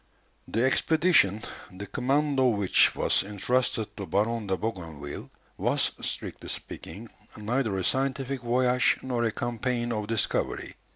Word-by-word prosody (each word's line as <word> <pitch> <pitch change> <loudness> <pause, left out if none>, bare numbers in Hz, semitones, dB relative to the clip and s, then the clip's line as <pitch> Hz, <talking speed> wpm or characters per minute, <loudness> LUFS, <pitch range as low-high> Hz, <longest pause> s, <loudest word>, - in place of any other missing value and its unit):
The 115 - 0
expedition, 135 - +3 0.3
the 95 +2 -7
command 140 +7 +1
of 125 -4 +4
which 100 -3 +4
was - - +2
entrusted 110 +2 0
to 100 -3 -5
Baron 105 +5 0
de 95 -1 0
Bougainville, 80 -10 -5 0.3
was, - - +2
strictly - - -4
speaking, - - -6 0.3
neither 110 -1 -1
a 95 - -1
scientific 135 +2 0
voyage 125 +1 +3
nor 125 -2 -1
a 115 - +1
campaign 120 +1 -2
of 105 -2 -2
discovery. 115 -2 -1
115 Hz, 130 wpm, -27 LUFS, 100-130 Hz, 0.3 s, of